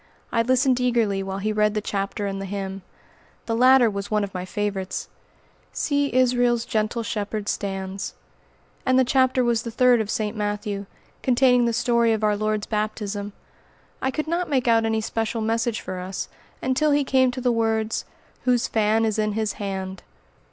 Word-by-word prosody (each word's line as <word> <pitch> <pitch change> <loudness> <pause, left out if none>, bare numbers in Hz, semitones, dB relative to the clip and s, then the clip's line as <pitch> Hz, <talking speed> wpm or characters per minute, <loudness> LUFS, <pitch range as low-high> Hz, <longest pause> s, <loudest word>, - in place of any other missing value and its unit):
I 230 - +2
listened 255 +1 +3
eagerly 230 -6 +1
while 195 0 -4
he 215 +2 -1
read 210 0 +2
the - - +2
chapter 205 0 -3
and 195 -1 -3
the 195 - -5
hymn. 195 0 -4 0.6
The 225 - -1
latter 255 +1 +6
was 200 -1 -3
one 210 -1 +1
of 200 - -5
my 180 -1 -4
favorites: 195 -1 -3 0.7
"See 285 -1 0
Israel's 245 -2 +2
gentle 215 +2 -1
Shepherd 210 -1 -3
stands;" 195 -1 -3 0.7
and 260 0 +3
the 260 - +6
chapter 260 0 +3
was 235 -2 +2
the 235 - -5
third 245 0 +4
of 210 - -4
St. 215 0 -1
Matthew, 205 -1 -3 0.3
containing 250 -1 +4
the 235 - +2
story 235 0 +2
of 220 -1 -2
our 210 -1 +3
Lord's 215 0 -1
baptism. 210 -1 -3 0.7
I 265 - +1
could 305 +3 -3
not 345 +2 -1
make 260 -4 +1
out 225 -1 +4
any 220 0 +1
special 225 +1 -2
message 225 +1 0
for 185 -1 -5
us, 185 +1 -5 0.3
until 260 +4 +2
he 290 0 +3
came 260 -1 +3
to 250 +1 -5
the 250 0 +2
words, 225 -1 0 0.4
"Whose 245 -2 +2
fan 220 +1 +2
is 220 -1 0
in 215 -1 +1
his 215 -1 -1
hand." 190 -1 -4
220 Hz, 180 wpm, -24 LUFS, 205-245 Hz, 0.7 s, latter